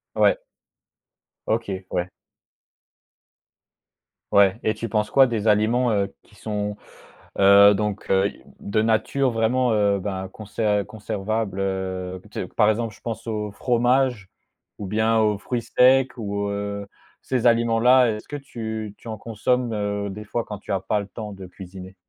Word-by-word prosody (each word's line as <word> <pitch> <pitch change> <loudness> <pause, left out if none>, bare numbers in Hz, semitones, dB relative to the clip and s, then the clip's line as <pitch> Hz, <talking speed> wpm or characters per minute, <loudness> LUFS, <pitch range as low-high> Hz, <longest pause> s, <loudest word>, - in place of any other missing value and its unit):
Ouais. - - +4 1.1
OK, 100 -4 -2
ouais. 90 0 -1 2.2
Ouais 100 +1 +4
et 110 - 0
tu 115 +2 -5
penses 105 0 0
quoi 135 - +6
des 115 -3 -2
aliments, 110 +4 +3
heu, 100 -2 0
qui - - -24
sont, 105 -1 -3 0.6
heu, 100 +1 +8
donc 105 0 -3
heu, 95 +1 +4
i - - -16 0.2
de 110 +2 0
nature 115 +4 +1
vraiment, 120 +2 +1
heu, 100 -2 +2
ben 95 -1 -4
conser 105 0 -1
conservable, 110 -1 -3
heu, 95 -1 -3
tu - - -4
sais, 90 - -5
par 105 +3 +2
exemple, 110 0 -1
je - - -22
pense 115 -2 -5
au 105 -2 -2
fromage 125 -2 +1 0.5
ou 105 - -5
bien 110 +3 +2
aux 105 -2 +2
fruits 120 +3 -3
secs 130 +3 +4
ou 100 -2 -3
heu, 100 0 -4 0.4
ces 125 -2 +1
aliments-là 115 +1 +4
est-ce 105 - -12
que 145 - -6
tu 110 -6 -6
tu - - -13
en 110 -1 -5
consommes, 115 +3 -1
heu, 100 -1 -2
des 105 +2 -8
fois 115 +2 -3
quand 105 -1 -7
tu - - -8
as 95 - +1
pas 105 - 0
le 100 - -6
temps 105 0 -7
de 95 -1 -9
cuisiner? 95 0 -11
105 Hz, 160 wpm, -23 LUFS, 100-115 Hz, 2.2 s, heu